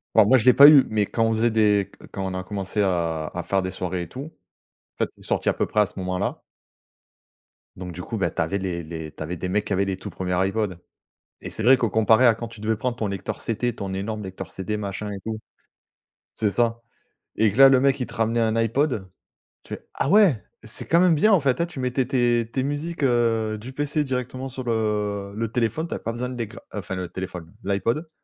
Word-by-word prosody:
Bon 110 -2 +7
moi, 130 +5 +6
je 110 - -1
l'ai 125 - +8
pas 140 +1 +10
eu, 145 -3 +8
mais 105 -1 +1
quand 115 +2 0
on 115 - +1
faisait 115 +1 +2
des 105 -3 +2
qu - - -14
quand 95 -1 -4
on 95 - -3
a 95 - -4
commencé 100 +1 -3
à 85 -5 0
à 90 -1 -4
faire 95 +2 0
des 95 0 -3
soirées 90 -1 -3
et - - -8
tout, 130 - -7 0.8
en - - +3
fait, - - -13
c'est - - -21
sorti - - +1
à - - +2
peu - - 0
près 105 - +1
à - - +4
ce - - -12
moment-là. 95 +1 -2 1.4
Donc 90 -1 -6
du 90 +2 -7
coup, 110 - -5
ben, 85 -4 0
tu - - 0
avais 80 +5 0
les 90 -3 -3
les 80 -1 -7
tu 75 - -14
avais 85 +3 -4
des 90 +2 -4
mecs 105 +2 0
qui - - -7
avaient 100 +1 +1
les 95 -1 -2
tout - - -7
1ers 90 -1 -4
iPod, 95 0 0 0.6
et - - -6
c'est 110 - -1
vrai 130 +2 +7
que 120 - 0
comparé 110 +3 +4
à 115 - +5
quand 115 0 -6
tu 115 -2 -13
devais 110 +1 0
prendre 125 +2 -2
ton 110 -3 -2
lecteur 100 -2 -5
CT 115 +1 -1
ton 100 -2 -5
énorme 105 +2 -4
lecteur 95 -1 -7
CD 105 +3 -3
machin 105 0 -4
et 100 - -5
tout 110 -1 -3 1.0
c'est 105 - +1
ça, 115 0 +1 0.6
et 110 -1 +3
que - - -8
là, 135 0 +10
le 130 - +5
mec, 140 0 +2
il 125 - -1
te - - -12
ramenait 115 +1 +1
un 110 -1 +1
iPod. 115 -3 0 0.6
Tu - - -9
fais: - - -17
«Ah 135 - -1
ouais! 190 - +5 0.2
C'est 110 - -3
quand 170 - +4
même 180 -2 +5
bien, 215 +9 +4
en 195 - +6
fait», 140 +3 +1
hein, - - +2
tu 160 -6 -9
mettais 125 0 0
tes 120 -3 +1
tes 130 - -1
musiques, 145 +3 -3
heu, 115 -3 +1
du 130 +4 -9
PC 145 +2 -1
directement 130 0 -4
sur 130 0 -5
le 105 -3 -1
le 115 0 -3
téléphone. 125 +8 -1
Tu - - -5
avais - - -6
pas 115 - -2
besoin 125 +2 -3
de 125 - -6
les 115 -3 -3
gra 115 - -12
heu, - - -2
enfin 95 -1 -5
le 90 -1 -4
téléphone, 90 -3 -7
l'iPod, 115 - -1
110 Hz, 255 wpm, -24 LUFS, 95-125 Hz, 1.4 s, pas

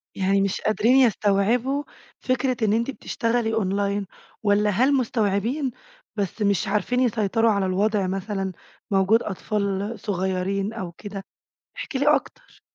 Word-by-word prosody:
يعني 195 +1 +2
مش 195 0 -1
قادرين 225 +4 +3
يستوعبوا 235 +3 +2 0.4
فكرة 255 -1 0
إن 210 - +2
أنتِ 230 +4 0
بتشتغلي 230 -3 -1
أونلاين، 200 -1 0 0.4
والّا 210 0 +3
هل 255 +8 +3
مستوعبين 240 +2 0 0.4
بس 205 +1 -3
مش 200 -2 +1
عارفين 215 +5 0
يسيطروا 225 -2 +2
على 200 -2 +1
الوضع 200 +1 +1
مثلًا، 195 0 -3 0.4
موجود 195 +4 +3
أطفال 200 +1 -2
صغيّرين 195 +1 -1
أو 185 -6 -5
كده؟ 195 +2 -8 0.5
احكِ 405 - -6
لي 290 +3 +4
أكتر. - - -7
210 Hz, 125 wpm, -24 LUFS, 195-235 Hz, 0.5 s, لي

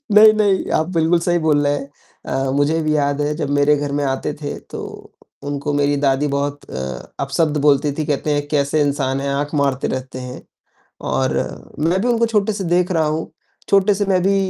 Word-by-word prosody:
नहीं, 215 +1 +9
नहीं, 205 -3 +1
आप 160 - -1
बिल्कुल 165 +2 +3
सही 175 0 +1
बोल 150 -2 +2
रहे 145 - +2
हैं। 140 - -7 0.6
अ, - - -1
मुझे 145 +4 +1
भी 155 0 +1
याद 145 0 +1
है 150 +1 0
जब 150 -3 -3
मेरे 145 +1 +4
घर 145 0 -3
में - - 0
आते 135 +2 -2
थे, 145 -1 -4
तो - - -9 0.7
उनको 145 +1 -2
मेरी 145 0 +2
दादी 140 +1 +1
बहुत 145 0 -3
अ, - - -5 0.4
अपशब्द 150 +3 0
बोलती 145 0 +3
थी, 155 +1 -3
कहते 150 +1 0
हैं 145 0 -2
कैसे 145 +1 +1
इंसान 135 -2 0
हैं, 140 - -2
आँख 145 +2 -2
मारते 135 -1 0
रहते 130 0 -6
हैं। 125 0 -7 0.7
और - - +1 0.5
मैं 185 +3 +1
भी 240 - 0
उनको 235 -1 +3
छोटे 215 -2 +1
से 200 -1 -4
देख 175 +1 +1
रहा 165 -3 +2
हूँ, 155 +2 -2 0.4
छोटे 200 +1 +4
से 205 - 0
मैं 190 -2 +2
भी 195 +1 +3
150 Hz, 205 wpm, -19 LUFS, 140-175 Hz, 0.7 s, नहीं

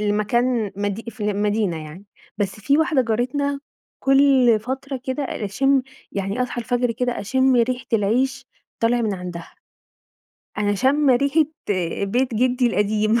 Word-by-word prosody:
لمكان 210 +2 0
مدي 205 +2 -3
في 230 - -18
المدينة 205 -5 -1
يعني. 160 +6 -11 0.3
بس 200 0 -2
في 280 +7 +2
واحدة 315 -4 +2
جارتنا 255 +5 -1 0.4
كُلّ 270 -4 +4
فترة 265 +3 -5
كده 260 +3 -2
أ 260 - -4
أشِم 270 +7 +2 0.3
يعني 200 +5 -2
أصحى 250 -1 -3
الفجر 245 +1 0
كده 245 +1 -2
أشِم 260 +5 +2
ريحة 245 +1 0
العيش 230 +6 +1 0.3
طالع 235 +1 +2
من 215 -3 0
عندها. 180 -2 -8 1.0
أنا 205 0 +1
شامّة 265 +4 +3
ريحة 280 +4 +2 0.6
بيت 245 +5 0
جدي 250 +2 +2
القديم 215 +1 +1
240 Hz, 135 wpm, -22 LUFS, 205-260 Hz, 1.0 s, كُلّ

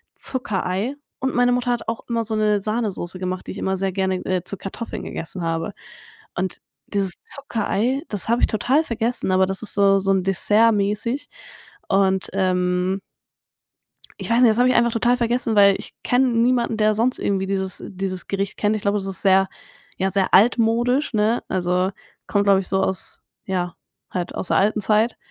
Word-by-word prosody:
Zuckerei.“ 210 -1 -2 0.2
Und 265 0 -2
meine 245 0 +3
Mutter 245 0 0
hat 240 -2 -2
auch 225 - -4
immer 230 -1 -1
so 220 0 -3
'ne 210 -1 +2
Sahnesoße 200 -4 -2
gemacht, 185 0 -4
die - - -4
ich - - -8
immer 190 - -1
sehr 190 0 -1
gerne, 190 -1 -1
äh, 185 -2 -1
zu 200 - -1
Kartoffeln 195 +5 -6
gegessen 170 +2 -5
habe. 165 -1 -2 0.6
Und 185 +1 -2 0.3
dieses 195 -3 +1
Zuckerei, 260 -1 -1
das 205 0 -3
habe 235 +1 +3
ich - - +4
total 250 +7 +2
vergessen, 230 -5 -1
aber 190 0 +4
das 195 0 -2
ist 215 - -2
so 200 -1 +4
so 195 0 0
'n 190 -1 +2
dessertmäßig 210 +5 +1 0.6
und, 190 -1 +2
ähm 185 0 0 1.2
ich - - -5
weiß 235 +1 +4
nicht, 245 - +7
das 215 - +1
habe 245 +1 +4
ich 255 - +3
einfach 235 0 +4
total 240 +2 +2
vergessen, 235 -1 0
weil 200 -1 +6
ich - - -11
kenne 255 +2 +3
niemanden, 235 0 +2
der 215 0 +3
sonst 235 +4 +1
irgendwie 195 -1 0
dieses 190 -1 -1
dieses 185 -2 -4
Gericht 195 0 -3
kennt. 210 +1 +1
Ich 215 - -4
glaube, 200 +1 +1
das 195 - -3
ist 195 -1 -4
sehr 195 -1 +4 0.5
ja, 190 +1 0
sehr 195 -1 +1
altmodisch, 240 +6 +3
ne? 220 +2 +1
Also, 180 0 0 0.4
kommt, 205 -1 +1
glaube 200 -1 +4
ich, 190 - -4
so 190 0 +1
aus 190 -1 -1 0.2
ja, 180 -2 -2 0.4
halt 180 -1 -3
aus - - -3
der - - +3
alten 210 +2 +2
Zeit. 215 +3 +2
200 Hz, 185 wpm, -22 LUFS, 190-230 Hz, 1.2 s, nicht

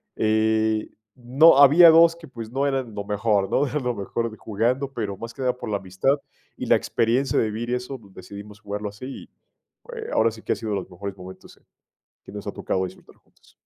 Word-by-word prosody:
eh, 110 0 +1 0.3
no 130 +6 +5
había 160 +5 +8
2 165 +1 +6
que, 170 -1 -13
pues, 115 -4 -8
no 135 +2 0
eran 135 -6 -2
lo 100 - -4
mejor, 105 -1 +1
¿no?, 145 - +2
lo 125 -3 -2
mejor 115 +2 -3
de 110 - -12
jugando, 120 +6 -1
pero 105 -6 -4
más 115 +4 -8
que 125 - -10
nada 125 -1 +1
por 125 - -7
la 105 - 0
amistad 95 +8 0 0.4
y - - -5
la - - +4
experiencia 120 +4 0
de - - +3
vivir 115 +3 -5
y 125 - +1
eso 125 +2 -6 0.2
decidimos 105 +1 -11
jugarlo 105 0 -5
así, 105 +5 -10
y, 135 - -8 0.7
eh, 450 -1 -6
ahora 115 +1 +3
sí 110 0 -12
que - - -1
ha - - -4
sido 110 -2 -4
los 95 - -5
mejores 100 +2 -7
momentos 95 0 -12
en - - -29 0.6
que - - -12
nos - - -8
ha - - -2
tocado 95 0 -2
disfrutar 95 +1 -13
juntos. - - -28
115 Hz, 215 wpm, -24 LUFS, 105-135 Hz, 0.7 s, había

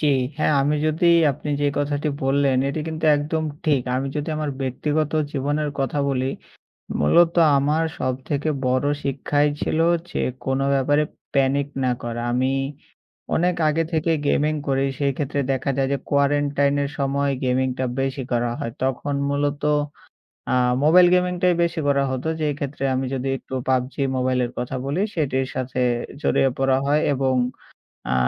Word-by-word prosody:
জি, 155 - +1 0.3
হ্যাঁ। 155 - +2
আমি 150 +2 +1
যদি 155 +3 +1 0.3
আপনি 145 - -8
যে - - +3
কথাটি 145 +1 -1
বললেন 135 0 +2
এটি 140 +3 -3
কিন্তু 160 0 -4
একদম 155 +2 -2 0.2
ঠিক। 145 -5 +2
আমি 135 +1 -1
যদি 150 +2 -3
আমার 150 -1 -2
ব্যক্তিগত 150 +4 -1 0.2
জীবনের 145 +2 -1
কথা 135 +2 -1
বলি। 130 -1 0 0.7
মূলত 165 - +4 0.2
আমার 150 +4 +1
সবথেকে 135 +4 -2 0.2
বড়ো 130 +3 +1
শিক্ষাই 145 +2 +1
ছিল - - -1 0.3
যে - - -2 0.3
কোনো 135 +1 +1
ব্যাপারে 145 +2 +2 0.3
প্যানিক 140 +1 +2 0.2
না 130 - +2
করা। 120 0 -4
আমি 130 +2 +1 0.8
অনেক 180 +1 +2
আগে 160 +2 +1
থেকে 165 +1 +1 0.2
গেমিং 150 +2 +2
করি 135 0 +1
সেই 140 -1 +2
ক্ষেত্রে 145 -1 -2
দেখা 135 +1 -1
যায় 135 -1 +1
যে - - 0
quarantine 140 0 +2
-এর 140 -1 -1
সময় 140 +1 +1
গেমিংটা 130 0 0 0.2
বেশি 135 0 -2
করা 120 0 +1
হয়। 115 - -3
তখন 135 +2 -1 0.2
মূলত 145 0 -1 0.9
আ - - +3 0.3
মোবাইল 175 +4 +7
গেমিংটাই 180 0 +2
বেশি 170 -1 -1
করা 140 -1 +3
হতো। 130 +4 -3
যে 155 - +1
ক্ষেত্রে 140 -1 -4
আমি 130 +1 -1
যদি 135 0 -2
একটু - - -12
PUBG 130 0 0 0.2
মোবাইলের 125 -1 0
কথা 125 +2 -3
বলি 145 +7 -1
সেটির 135 -5 0
সাথে 130 0 -2 0.4
জড়িয়ে 135 -3 +2
পড়া 135 0 +2
হয় 145 +2 +2
এবং 135 -1 +1 0.8
আ - - +3
140 Hz, 155 wpm, -22 LUFS, 130-150 Hz, 0.9 s, মোবাইল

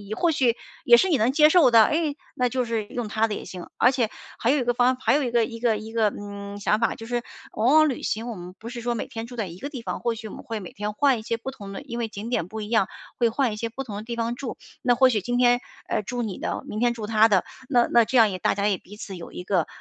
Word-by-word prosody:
或 340 +8 +2
许 250 -6 +2 0.3
也 475 - +8
是 380 - +3
你 315 - +3
能 235 +2 +2
接 300 +2 +6
受 310 -7 +6
的。 225 -1 +8
哎， 305 +1 0 0.2
那 250 -1 +1
就 255 0 -1
是 225 -2 -2
用 240 -1 -4
她 220 +1 +1
的 215 - -3
也 - - -7
行， 180 -2 -8
而 245 - +5
且 245 -5 0 0.3
还 235 - +2
有 290 - +2
一 - - 0
个 245 0 +1
方 250 +1 +4
法 255 - -23
还 - - +4
有 295 - +2
一 245 - -2
个 235 -2 +3
一 230 0 -8
个 230 -2 +2
一 220 +1 -9
个， 225 -2 +2
嗯， 200 0 -7
想 210 +1 +1
法 230 - +1
就 225 - -9
是， 240 0 -1 0.3
往 235 +6 +2
往 310 0 +6
旅 260 - -4
行 225 +2 -2
我 230 - -5
们 180 -1 -9
不 230 - -7
是 240 0 -6
说 240 0 -1
每 225 - -4
天 225 -1 -6
住 245 - -10
在 220 -4 -2
一 170 0 -9
个 285 - -6
地 255 -6 -6
方， - - -4
或 235 -1 0
许 220 0 -8
我 - - -9
们 - - -10
会 225 -1 -4
每 185 -4 -9
天 210 +1 -4
换 270 +2 +3
一 - - -7
些 230 +1 -1
不 250 +3 -6
同 200 -6 -10
的 195 - -6
因 240 -4 -7
为 230 - -1
景 215 +1 -7
点 210 -9 -1
不 220 +3 -6
一 210 - -6
样， 220 -5 +3 0.3
会 235 -2 +3
换 240 0 0
一 - - -4
些 230 +1 -3
不 265 +4 -6
同 220 -6 -7
的 210 - -6
地 235 +1 -5
方 235 +1 -1
住， 255 -1 -5 0.3
那 245 -1 +4
或 260 +2 +6
许 225 -4 +1
今 245 +5 -1
天， 245 0 +4 0.3
呃， - - 0
住 245 +4 -3
你 215 -5 -4
的， - - -3
明 215 - -4
天 240 0 +2
住 220 -3 -6
她 220 0 +5
的， 195 -4 +3 0.3
那 245 -3 +4
那 235 -1 +6
这 260 - +1
样 220 -2 +6
也 185 - -3
大 - - +2
家 200 +1 +1
也 200 -2 +1
彼 200 +4 -14
此 195 -2 -7
有 170 - -9
一 180 - -7
个 180 -4 +1
230 Hz, 340 characters per minute, -25 LUFS, 210-245 Hz, 0.3 s, 也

